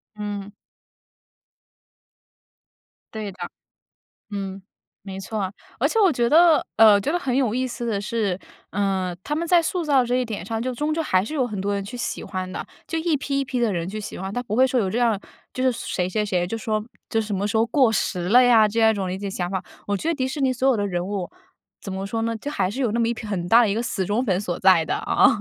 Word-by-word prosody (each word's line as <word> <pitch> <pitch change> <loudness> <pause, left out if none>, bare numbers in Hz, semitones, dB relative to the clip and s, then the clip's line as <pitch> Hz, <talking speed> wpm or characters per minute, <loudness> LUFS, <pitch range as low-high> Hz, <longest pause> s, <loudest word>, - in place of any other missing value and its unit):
嗯。 205 -1 -5 2.6
对 215 -2 -4
的。 190 - -18 0.9
嗯， 195 -1 -4 0.4
没 190 -1 -7
错。 195 -1 -3 0.3
而 - - +2
且 450 - 0
我 385 -6 +5
觉 240 -2 +1
得 325 +2 +6
呃， 215 -2 +7
觉 280 - -1
得 350 - +1
很 265 -7 -2
有 255 -5 +1
意 255 +1 0
思 240 -1 -5
的 210 -3 -1
是， 205 -3 -1 0.3
呃， 190 -2 -1
他 295 - -2
们 335 +2 -2
在 345 -2 +5
塑 355 +2 -1
造 280 -5 +3
这 245 +1 0
一 255 - +1
点 215 -6 -5
上 225 +3 -3
就 255 +1 -2
终 295 +5 -1
究 325 +1 0
还 185 -10 +2
是 310 - -6
有 260 -4 +1
很 210 -4 -5
多 200 +1 -1
人 200 - -2
去 240 +5 -7
喜 - - -3
欢 185 0 -4
的， 185 - -5 0.2
就 325 - -2
一 320 -1 +1
批 275 0 -1
一 - - -1
批 255 -1 -3
的 230 -4 +1
人 170 -1 -2
去 215 +3 -5
喜 210 - -7
欢， 190 +1 -5
它 245 - -2
不 215 -4 -4
会 260 +3 +5
说 260 -1 0
有 195 -5 +1
这 230 - -1
样 230 -4 +2 0.4
就 255 - -2
是 255 - +4
谁 185 -6 -2
谁 210 +3 0
谁 180 -3 0
就 225 +5 -4
说 215 -1 -2 0.2
这 225 - +1
什 210 -2 -3
么 200 +2 -1
时 215 - -1
候 220 - +4
过 255 0 +3
时 180 -4 -1
了 245 +5 +7
呀， 230 -4 +6
这 230 +2 -1
样 220 0 +6
一 - - +1
种 195 -3 -2
理 185 - -3
解 200 0 -4
想 180 -2 -3
法。 190 -1 -2 0.2
我 205 0 0
觉 315 - -3
得 335 - +2
迪 260 -3 -1
士 285 +2 -4
尼 265 -1 +2
所 255 +2 +1
有 260 - +4
的 205 -1 0
人 175 -2 -2
物 195 -3 -3 0.5
怎 - - -7
么 190 +1 -4
说 225 +3 -2
呢？ 230 0 -1
就 285 - -5
还 190 -10 0
是 265 +7 -3
有 235 -5 +1
那 235 - 0
么 230 - +2
一 235 - 0
批 225 -1 -8
很 180 -4 -3
大 235 +4 +7
的 215 - +2
一 200 - 0
个 230 - -1
死 210 -5 -2
忠 210 +6 0
粉 185 -5 +1
所 175 -4 -3
在 185 -4 +5
的 - - -1
啊， - - +3
220 Hz, 280 characters per minute, -23 LUFS, 195-255 Hz, 2.6 s, 呃